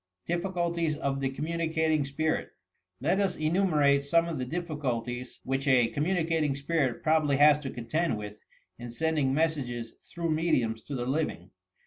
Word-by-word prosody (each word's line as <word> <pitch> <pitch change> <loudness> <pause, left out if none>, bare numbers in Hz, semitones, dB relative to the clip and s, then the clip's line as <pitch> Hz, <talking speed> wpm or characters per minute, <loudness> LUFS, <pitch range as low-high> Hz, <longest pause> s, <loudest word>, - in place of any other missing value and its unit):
MPPICULTIES 170 -3 -1
OF 140 -2 -1
THE 135 - +1
COMMtraiCATlNQ 160 0 0
SPIRIT 155 +3 -1 0.5
Let 170 +8 +2
us 195 -2 +1
enumerate 155 -4 +2
some 165 +4 +2
of 165 -5 -3
the 125 - -3
difficulties 125 -7 -3
which 135 +2 -2
a 125 -4 +4
communicating 160 -2 0
spirit 140 -3 -1
probably 155 -3 +3
has 150 +1 +6
to 140 -3 -5
contend 125 +4 -1
with, 105 0 -7 0.4
in 120 0 -7
sending 150 +1 0
messages 135 -7 -1 0.2
through 170 -1 -2
mediums 125 -9 +1
to 145 - -5
the 120 -1 -2
living. 130 - -2
150 Hz, 145 wpm, -29 LUFS, 130-165 Hz, 0.5 s, has